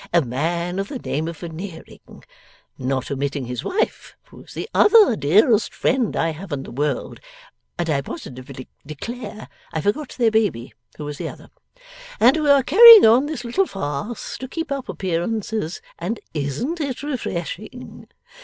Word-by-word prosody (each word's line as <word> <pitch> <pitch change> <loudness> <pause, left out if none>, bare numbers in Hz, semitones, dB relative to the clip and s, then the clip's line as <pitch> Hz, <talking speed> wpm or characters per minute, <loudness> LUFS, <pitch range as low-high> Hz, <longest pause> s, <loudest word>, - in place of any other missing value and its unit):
A 170 -2 +4
man 170 +8 -2
of 195 - -2
the 270 - -5
name 160 - -3
of 165 -1 -6
Veneering. 170 0 -10 0.5
Not 130 0 -3
omitting 140 0 -2
his 125 0 -5
wife, 415 +4 -2
who - - -14
is - - -14
the - - -4
other 415 - +6
dearest 205 - +3
friend 255 -4 0
I 165 - +1
have 170 +3 -9
in 140 -2 -3
the - - -10
world; 145 +4 -3 0.6
and 175 -1 -2
I 145 -3 +1
positively 130 -1 -9 0.2
declare 215 - -7 0.2
I 160 - -2
forgot 250 - -2
their 235 -3 +3
baby, 205 - 0 0.2
who 150 - -6
is 145 -1 -7
the - - -3
other. - - -13 0.7
And 255 - +6
we 305 -2 0
are 280 -1 +6
carrying 450 - +10
on 240 +6 +5
this 295 -6 -5
little 370 +11 +1
farce 190 +6 -5
to 260 - -6
keep 325 +3 -5
up 275 -2 -4
appearances, 190 +1 -3 0.2
and 195 +7 -3
isn't 155 - -3
it 275 -2 -4
refreshing! 245 - -6
195 Hz, 165 wpm, -21 LUFS, -, 0.7 s, carrying